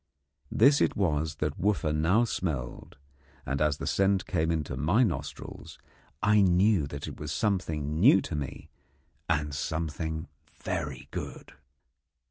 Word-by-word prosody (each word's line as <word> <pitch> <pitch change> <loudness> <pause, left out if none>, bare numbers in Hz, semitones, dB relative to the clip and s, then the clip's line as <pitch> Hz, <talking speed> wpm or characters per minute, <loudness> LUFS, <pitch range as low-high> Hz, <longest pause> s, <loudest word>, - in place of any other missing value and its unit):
This 140 +2 +5
it - - +2
was 80 -5 0
that 75 -1 -3
Wooffa 95 -6 +1
now 85 +9 +3
smelled, 75 - -4 0.5
and 70 +1 -2
as 75 -1 +2
the - - -5
scent 95 0 +2
came 80 -3 0
to 65 - -6
my 80 - +3
nostrils 70 - -5 0.5
I 105 0 +5
knew 95 -3 +3
that 70 0 -6
it - - -8
was 75 -1 -5
something 80 -4 -1
new - - +7
to - - -5
me 75 +1 -6 0.6
and 75 -3 0
something 80 +2 -3 0.4
very 70 -2 -3
good. - - -7
80 Hz, 135 wpm, -28 LUFS, 75-95 Hz, 0.6 s, new